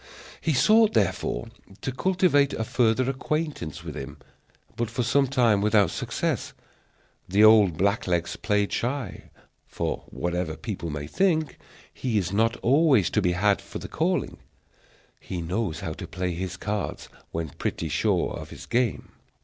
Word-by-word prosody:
He 160 Hz, -, +1 dB
sought, 215 Hz, -, +5 dB
therefore, 95 Hz, -, 0 dB, 0.3 s
to 130 Hz, -, -2 dB
cultivate 170 Hz, -2 st, +2 dB
a 110 Hz, -, -2 dB
further 120 Hz, +2 st, +2 dB
acquaintance 135 Hz, -, -3 dB
with -, -, -6 dB
him, -, -, -7 dB, 0.6 s
but 115 Hz, -1 st, -2 dB
for 120 Hz, +1 st, -2 dB
some 135 Hz, +4 st, +3 dB
time 120 Hz, -6 st, +3 dB
without 105 Hz, -3 st, +3 dB
success; -, -, -2 dB, 0.8 s
the 100 Hz, +3 st, +4 dB
old 105 Hz, -6 st, +6 dB
black 100 Hz, +4 st, +1 dB
legs 85 Hz, -2 st, 0 dB
played 105 Hz, -1 st, 0 dB
shy, 125 Hz, -3 st, -3 dB, 0.4 s
for, -, -, -3 dB
whatever 85 Hz, -2 st, -3 dB
people 100 Hz, -7 st, -5 dB
may 75 Hz, -1 st, -4 dB
think, 160 Hz, -, 0 dB, 0.3 s
he 120 Hz, -4 st, -1 dB
is 95 Hz, -2 st, -1 dB
not 115 Hz, +3 st, +2 dB
always 135 Hz, -, +4 dB
to 105 Hz, -, +2 dB
be 90 Hz, -2 st, +2 dB
had 100 Hz, +3 st, +2 dB
for -, -, -8 dB
the -, -, -7 dB
calling; -, -, -1 dB, 0.8 s
he 90 Hz, -, -5 dB
knows 90 Hz, +1 st, -2 dB
how -, -, -3 dB
to -, -, -8 dB
play 90 Hz, 0 st, -3 dB
his 90 Hz, +1 st, -4 dB
cards 105 Hz, +1 st, -3 dB, 0.2 s
when 80 Hz, -1 st, -3 dB
pretty 80 Hz, -, -3 dB
sure 85 Hz, +5 st, +1 dB
of -, -, -7 dB
his -, -, -10 dB
game. 120 Hz, -2 st, 0 dB
105 Hz, 155 wpm, -26 LUFS, 90-130 Hz, 0.8 s, old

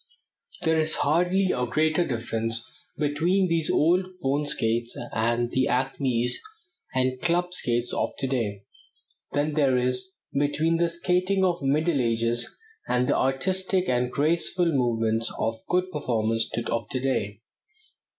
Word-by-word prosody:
There 160 Hz, 0 st, +3 dB
is 155 Hz, 0 st, +1 dB
hardly 180 Hz, +5 st, +2 dB
a 125 Hz, 0 st, -1 dB
greater 155 Hz, +6 st, +2 dB
difference 115 Hz, -3 st, -3 dB, 0.3 s
between 165 Hz, +6 st, +1 dB
these 165 Hz, -2 st, +1 dB
old 175 Hz, +5 st, +3 dB, 0.2 s
bone 145 Hz, 0 st, 0 dB
skates 115 Hz, -2 st, -1 dB, 0.2 s
and 120 Hz, +2 st, 0 dB
the 130 Hz, 0 st, +2 dB
"acmes" 125 Hz, -1 st, 0 dB, 0.5 s
and 130 Hz, 0 st, 0 dB
club 175 Hz, +1 st, +1 dB
skates 120 Hz, -7 st, -1 dB
of -, -, 0 dB
to -, -, -1 dB
day, 110 Hz, -7 st, -2 dB, 0.7 s
than 145 Hz, +1 st, 0 dB
there 140 Hz, -4 st, +3 dB
is 125 Hz, +7 st, +1 dB, 0.2 s
between 150 Hz, +4 st, +1 dB
the 170 Hz, 0 st, +2 dB
skating 180 Hz, +3 st, +1 dB
of 175 Hz, -2 st, +1 dB
the 140 Hz, -, -3 dB
Middle 155 Hz, +1 st, +2 dB
Ages 115 Hz, 0 st, 0 dB, 0.3 s
and 125 Hz, 0 st, +1 dB
the -, -, +2 dB
artistic 185 Hz, +7 st, +1 dB
and 125 Hz, 0 st, +1 dB
graceful 170 Hz, +3 st, +1 dB
movements 115 Hz, -4 st, +1 dB
of 110 Hz, 0 st, -2 dB
good 185 Hz, +1 st, +1 dB
performers 115 Hz, -6 st, 0 dB, 0.2 s
of 115 Hz, -2 st, -2 dB
to 130 Hz, -, -2 dB
day. 115 Hz, -5 st, -2 dB
135 Hz, 140 wpm, -26 LUFS, 120-165 Hz, 0.7 s, There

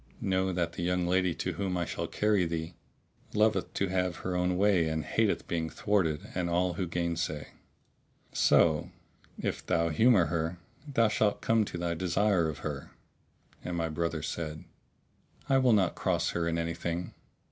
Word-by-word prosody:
Know, 95 Hz, 0 st, 0 dB
that 85 Hz, -2 st, -1 dB
the -, -, -5 dB
young 90 Hz, 0 st, +1 dB
lady, 90 Hz, -1 st, +2 dB
to 90 Hz, -, -2 dB
whom 90 Hz, +1 st, -2 dB
I 85 Hz, -, 0 dB
shall -, -, -4 dB
carry 105 Hz, -4 st, +2 dB
thee, 80 Hz, +1 st, -4 dB, 0.6 s
loveth 110 Hz, +1 st, +2 dB
to 95 Hz, -, +1 dB
have 90 Hz, -2 st, 0 dB
her 90 Hz, +1 st, -4 dB
own 90 Hz, 0 st, +1 dB
way 95 Hz, -4 st, +3 dB
and 80 Hz, -1 st, -2 dB
hateth -, -, 0 dB
being 80 Hz, -2 st, -1 dB
thwarted 85 Hz, -5 st, 0 dB
and 90 Hz, -1 st, -1 dB
all 90 Hz, +1 st, +1 dB
who 90 Hz, +1 st, -2 dB
gainsay; 85 Hz, -3 st, -2 dB, 0.8 s
so, 80 Hz, -3 st, +4 dB, 0.5 s
if -, -, -3 dB
thou 85 Hz, 0 st, +1 dB
humour 105 Hz, +2 st, +5 dB
her, 80 Hz, +2 st, -2 dB, 0.3 s
thou 115 Hz, -4 st, +4 dB
shalt 105 Hz, -1 st, +1 dB
come 115 Hz, -1 st, +3 dB
to 90 Hz, -, -6 dB
thy 85 Hz, 0 st, -1 dB
desire 90 Hz, 0 st, +1 dB
of 75 Hz, -, -6 dB
her." -, -, -4 dB, 0.7 s
And 90 Hz, -1 st, -3 dB
my 85 Hz, -1 st, -1 dB
brother 85 Hz, -1 st, -2 dB
said, 80 Hz, -1 st, -4 dB, 0.8 s
"I 135 Hz, -2 st, +4 dB
will 130 Hz, -2 st, +4 dB
not 95 Hz, -4 st, +3 dB
cross 85 Hz, -3 st, 0 dB
her 85 Hz, -1 st, -1 dB
in 85 Hz, 0 st, 0 dB
anything." 85 Hz, +1 st, -3 dB
85 Hz, 170 wpm, -30 LUFS, 85-95 Hz, 0.8 s, humour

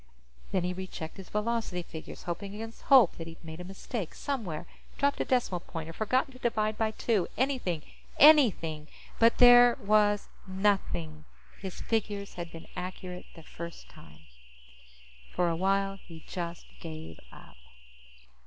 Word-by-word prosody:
Then 185 Hz, -2 st, +1 dB
he 180 Hz, +1 st, -1 dB
rechecked 185 Hz, -3 st, -7 dB
his 190 Hz, -2 st, -10 dB
velocity 210 Hz, -4 st, -1 dB
figures, 160 Hz, -1 st, -9 dB
hoping 195 Hz, +4 st, -5 dB
against 225 Hz, +1 st, -8 dB
hope 260 Hz, -8 st, +7 dB
that 165 Hz, -, -6 dB
he'd 165 Hz, 0 st, -12 dB
made 160 Hz, +1 st, -8 dB
a -, -, -6 dB
mistake 195 Hz, +1 st, -6 dB
somewhere, 205 Hz, -, -3 dB, 0.3 s
dropped 280 Hz, 0 st, +1 dB
a -, -, 0 dB
decimal 240 Hz, -8 st, +1 dB
point 165 Hz, -2 st, -7 dB
or -, -, -7 dB
forgotten 255 Hz, -, 0 dB
to 255 Hz, -, -14 dB
divide 215 Hz, -3 st, 0 dB
by 220 Hz, 0 st, +1 dB
two. 215 Hz, -3 st, 0 dB
Anything. 245 Hz, -, 0 dB, 0.3 s
Anything! 200 Hz, -, +6 dB, 0.3 s
But 230 Hz, 0 st, +5 dB
there 245 Hz, -1 st, +8 dB
was 205 Hz, 0 st, +3 dB, 0.2 s
nothing. 190 Hz, -5 st, -1 dB, 0.3 s
His 190 Hz, -2 st, -7 dB
figures 205 Hz, -3 st, -2 dB
had 175 Hz, -1 st, -6 dB
been 165 Hz, 0 st, -10 dB
accurate 180 Hz, 0 st, -6 dB
the 165 Hz, -, -12 dB
first 170 Hz, +2 st, -9 dB
time. 75 Hz, -1 st, -15 dB, 1.1 s
For 175 Hz, -1 st, +2 dB
a 165 Hz, -, 0 dB
while, 195 Hz, +2 st, +1 dB
he 165 Hz, -2 st, -12 dB
just 170 Hz, -2 st, -5 dB
gave 160 Hz, -1 st, -8 dB
up. -, -, -15 dB
190 Hz, 150 wpm, -29 LUFS, 170-225 Hz, 1.1 s, there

